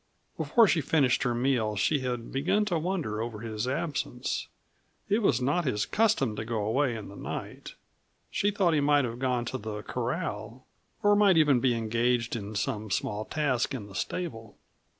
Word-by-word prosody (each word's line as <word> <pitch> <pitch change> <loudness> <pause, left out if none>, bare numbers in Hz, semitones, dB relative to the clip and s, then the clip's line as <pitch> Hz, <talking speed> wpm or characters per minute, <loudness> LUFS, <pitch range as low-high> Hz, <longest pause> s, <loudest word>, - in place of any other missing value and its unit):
Before 230 -3 +4
she 170 - +3
had 145 - -6
finished 140 -6 +3
her 120 -2 +1
meal 120 -4 +1
she 145 +9 +2
had 125 -2 -4
begun 190 +10 +1
to 175 -6 0
wonder 155 - -2
over 115 -2 -5
his 110 0 -3
absence 140 -3 -2 0.6
it 210 - +2
was 130 - +3
not 145 +7 +1
his 105 -8 0
custom 205 - +2
to - - -2
go 110 -2 -2
away 125 +3 +1
in 110 -2 -7
the 100 - -11
night. - - -7 0.6
She 205 - +1
thought 195 -5 +2
he 155 - +3
might 145 -1 +4
have 120 0 -5
gone 125 -2 0
to 130 +2 -4
the 105 -1 -5
corral, 125 - -4 0.4
or 205 0 +5
might 200 -4 +5
even 145 -5 +5
be 125 -1 +2
engaged 115 +1 0
in 105 -1 -5
some 105 +1 -2
small 105 +2 -2
task 135 -4 0
in 110 -6 -6
the 100 - -12
stable. 115 - -4
125 Hz, 185 wpm, -28 LUFS, 110-155 Hz, 0.6 s, or